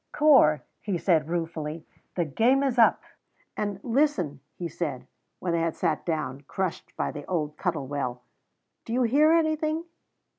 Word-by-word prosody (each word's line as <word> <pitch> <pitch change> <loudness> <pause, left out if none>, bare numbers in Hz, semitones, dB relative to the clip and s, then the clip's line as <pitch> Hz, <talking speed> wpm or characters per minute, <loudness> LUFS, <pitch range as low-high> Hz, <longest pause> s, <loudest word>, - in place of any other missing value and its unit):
"Corp," 270 - +5 0.2
he 200 -4 -1
said 160 -3 +2
ruefully, 165 -2 -3 0.3
"the 175 - +1
game 240 - +3
is 260 -3 0
up!" 230 - +5 0.5
And 205 -2 -3
"Listen," 230 - +1 0.2
he 175 - -4
said, 150 -6 -4 0.3
when 175 -2 -2
they 170 - +1
had 165 -1 -1
sat - - -1
down, 155 -5 -2
crushed, 190 -3 -4
by - - -1
the 145 - -7
old 155 -5 -2
Cuttle 165 -7 -2
Well, 130 -3 -3 0.6
"do 230 - -5
you 250 +1 +2
hear 290 +7 +4
anything?" 315 -1 +1
175 Hz, 155 wpm, -27 LUFS, 150-250 Hz, 0.6 s, Corp